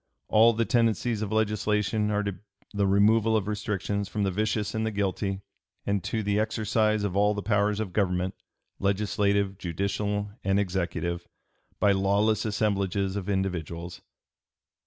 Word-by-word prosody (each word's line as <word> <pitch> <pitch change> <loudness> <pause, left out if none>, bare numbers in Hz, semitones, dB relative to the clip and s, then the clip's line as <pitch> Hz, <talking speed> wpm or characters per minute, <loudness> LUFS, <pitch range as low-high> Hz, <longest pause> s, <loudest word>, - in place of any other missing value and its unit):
All 115 +2 +6
the 115 +1 0
tendencies 115 -1 +1
of 105 -1 -3
legislation 105 -1 +1
are 105 0 0
to 100 -2 -4 0.3
the 100 -1 +1
removal 110 +3 +4
of 100 -2 -2
restrictions 100 -1 -2
from 105 - -1
the 95 - +1
vicious 105 +1 -1
and 110 0 -1
the 110 - 0
guilty, 100 -1 -2 0.4
and 100 -2 0
to 110 -1 -1
the 105 0 +1
exercise 110 0 +1
of 100 -2 -2
all 105 +1 +3
the 105 - -4
powers 105 -1 +1
of 100 -5 -3
government, 90 -2 0 0.5
legislative, 100 0 +1
judicial, 100 +3 -2
and 95 +1 +2
executive, 85 -2 -2 0.5
by 100 - +4
lawless 100 +3 +2
assemblages 100 -2 0
of 100 -1 -4
individuals." 90 -3 -3
100 Hz, 145 wpm, -27 LUFS, 95-105 Hz, 0.5 s, All